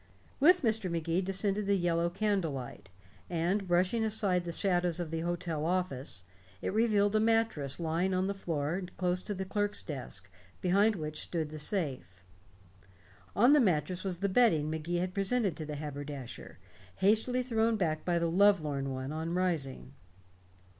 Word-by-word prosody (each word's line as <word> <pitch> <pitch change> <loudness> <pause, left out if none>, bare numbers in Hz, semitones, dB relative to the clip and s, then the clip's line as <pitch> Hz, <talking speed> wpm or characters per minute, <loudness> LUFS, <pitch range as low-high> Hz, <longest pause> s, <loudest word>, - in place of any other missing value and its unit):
With 355 +4 +5
Mr. 220 -4 +1
Magee 170 +1 0
descended 195 +2 0
the 200 0 +3
yellow 170 -1 +1
candlelight, 175 - -2 0.4
and 180 +4 0
brushing 180 +6 +2
aside 205 -5 +1
the 170 - -3
shadows 175 -1 +1
of 170 -3 -4
the 165 - -2
hotel 170 -2 -2
office, 140 - -2 0.4
it - - -3
revealed 210 -2 +3
a - - +5
mattress 220 -12 +1
lying 170 +3 0
on 185 0 +1
the 200 - -1
floor 165 -2 -2 0.2
close 180 0 0
to 205 - -4
the 190 +1 -4
clerk's 205 +1 -1
desk, 125 - -6 0.3
behind 200 +4 +3
which 155 -3 -4
stood 160 -3 -2
the 155 - -7
safe. 130 - -3 1.1
On 245 +7 +6
the 300 - +6
mattress 180 - +1
was 190 -3 -2
the 200 +3 0
bedding 185 -8 +3
Magee 160 +2 -2
had 180 +1 -2
presented 200 -2 +1
to 155 - -5
the 150 - -4
haberdasher, 145 -3 -7 0.4
hastily 225 - +2
thrown 230 -2 +1
back 160 -6 -1
by 175 -1 +1
the 170 0 +1
lovelorn 160 -8 +3
one 130 +1 -4
on 160 +2 -3
rising. 140 - -2
180 Hz, 160 wpm, -31 LUFS, 155-200 Hz, 1.1 s, On